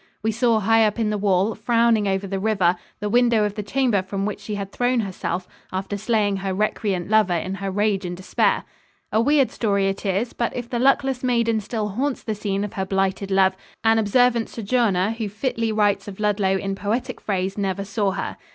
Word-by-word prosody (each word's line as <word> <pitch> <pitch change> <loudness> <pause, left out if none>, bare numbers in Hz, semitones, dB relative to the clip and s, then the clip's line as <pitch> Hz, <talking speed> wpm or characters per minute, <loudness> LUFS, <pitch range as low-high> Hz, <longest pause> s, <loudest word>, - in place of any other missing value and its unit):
We 220 - +2
saw 230 0 +2
high 225 +2 +4
up 210 - -3
in 220 -2 0
the 210 - 0
wall, 200 +1 +2
frowning 230 -1 +2
over 195 0 0
the 195 0 -3
river, 190 -4 +2 0.2
the 210 - -2
window 235 0 +3
of 205 -1 -1
the 210 - -4
chamber 230 -1 +1
from 195 +1 -3
which 210 - -3
she 210 - -5
had 200 -1 -5
thrown 245 +1 +1
herself 185 -2 -4 0.2
after 190 +2 -3
slaying 205 -1 +1
her 190 -1 -3
recreant 200 -3 -1
lover 210 -4 +3
in 185 +3 -2
her 195 - -2
rage 205 0 0
and 175 -1 -5
despair. 190 - +1 0.5
A 220 - +3
weird 280 +1 +3
story 200 -3 +1
it 195 - -4
is, 205 +4 -1
but 235 - -2
if 245 -1 -4
the 240 -1 -2
luckless 270 0 +2
maiden 235 -3 +2
still 215 0 -3
haunts 260 +7 -2
the 220 - -2
scene 200 -1 -2
of 205 - -5
her 190 - -2
blighted 195 0 0
love, 190 -1 +3 0.3
an 225 0 +4
observant 235 +2 +2
sojourner 215 -4 +1
who 225 -2 -4
fitly 225 +1 -2
writes 210 -2 +1
of 200 -1 -8
Ludlow 205 -2 +1
in 195 +1 -3
poetic 230 +6 -3
phrase 190 -1 -2
never 195 -1 -2
saw 200 0 0
her. 195 0 -4
210 Hz, 205 wpm, -23 LUFS, 195-230 Hz, 0.5 s, high